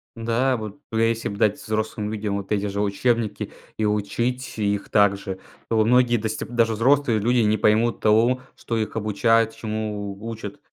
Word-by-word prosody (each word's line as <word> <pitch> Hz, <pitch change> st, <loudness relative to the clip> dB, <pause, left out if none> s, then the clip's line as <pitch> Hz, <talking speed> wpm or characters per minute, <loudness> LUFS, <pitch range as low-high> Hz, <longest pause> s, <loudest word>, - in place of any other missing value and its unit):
Да, 120 Hz, +3 st, +1 dB
вот 110 Hz, +3 st, -7 dB
б 110 Hz, -, 0 dB
если 115 Hz, 0 st, -2 dB
б 100 Hz, -, -5 dB
дать 105 Hz, -1 st, +2 dB
взрослым 110 Hz, -1 st, -2 dB
видим 105 Hz, -2 st, -2 dB
вот 100 Hz, +1 st, -3 dB
эти 100 Hz, 0 st, 0 dB
же 100 Hz, +1 st, -3 dB
учебники 105 Hz, +1 st, 0 dB, 0.3 s
и 110 Hz, -, -1 dB
учить 115 Hz, +5 st, -1 dB
их 100 Hz, -1 st, -1 dB
так 100 Hz, -2 st, +4 dB
же, 95 Hz, -1 st, -6 dB, 0.3 s
то 110 Hz, -1 st, +3 dB
многие 125 Hz, +1 st, +4 dB
дасте 110 Hz, -1 st, -2 dB
даже 115 Hz, -1 st, +1 dB
взрослые 125 Hz, 0 st, +3 dB
люди 120 Hz, +4 st, +2 dB
не 110 Hz, -1 st, +3 dB
поймут 110 Hz, +2 st, +2 dB
того, 115 Hz, +4 st, +3 dB
что 115 Hz, -, -3 dB
их 110 Hz, 0 st, -2 dB
обучают, 115 Hz, +1 st, +2 dB
чему 105 Hz, -3 st, -4 dB
учат. 110 Hz, -3 st, -7 dB
110 Hz, 175 wpm, -23 LUFS, 105-115 Hz, 0.3 s, так